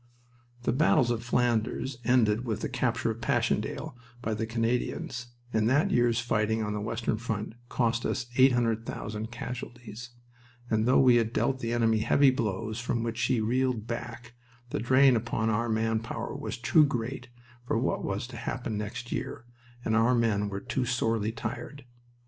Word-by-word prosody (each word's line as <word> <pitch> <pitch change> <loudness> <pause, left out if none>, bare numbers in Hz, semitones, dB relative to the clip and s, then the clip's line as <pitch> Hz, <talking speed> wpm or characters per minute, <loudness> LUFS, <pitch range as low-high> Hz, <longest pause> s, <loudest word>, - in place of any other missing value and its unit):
The - - +2
battles 130 -3 +3
of 115 -1 -1
Flanders 120 +1 0
ended 115 -2 +3
with 110 -3 -3
the - - -2
capture 120 -1 0
of 115 +1 -7
Passchendaele 115 - -1 0.2
by 115 -2 -2
the 110 +1 -2
Canadians, 120 +4 -2 0.3
and 110 0 +2
that 145 +9 +3
year's 120 -1 +3
fighting 110 -1 0
on 105 0 -2
the 105 - -3
western 110 +1 -1
front 110 -2 -3 0.2
cost 115 -1 +1
us 120 - -1
800,000 115 -4 +1
casualties, 120 -1 -7 0.6
and 110 +1 +2
though 130 - +5
we 125 -2 +6
had 115 -1 +1
dealt 130 0 +1
the 115 -2 -3
enemy 115 -2 +2
heavy 140 +5 +5
blows 110 -3 -2
from 120 -1 -1
which 115 0 -3
he 125 -3 +1
reeled 125 0 0
back, 120 0 -6 0.4
the - - -1
drain 130 +3 +5
upon 115 -1 0
our 115 +2 0
man 110 0 +1
power 115 - -5
was - - -4
too 125 +6 +5
great 125 -2 -2 0.4
for - - +1
what 125 - 0
was 100 +3 -2
to 120 - -8
happen 115 -5 -3
next 120 +3 -5
year, - - -4 0.4
and 110 - +1
our 115 +2 +4
men 105 -3 +1
were 100 0 -4
too 125 +2 -1
sorely 115 -3 0
tried. 140 +2 -6
115 Hz, 165 wpm, -29 LUFS, 110-125 Hz, 0.6 s, we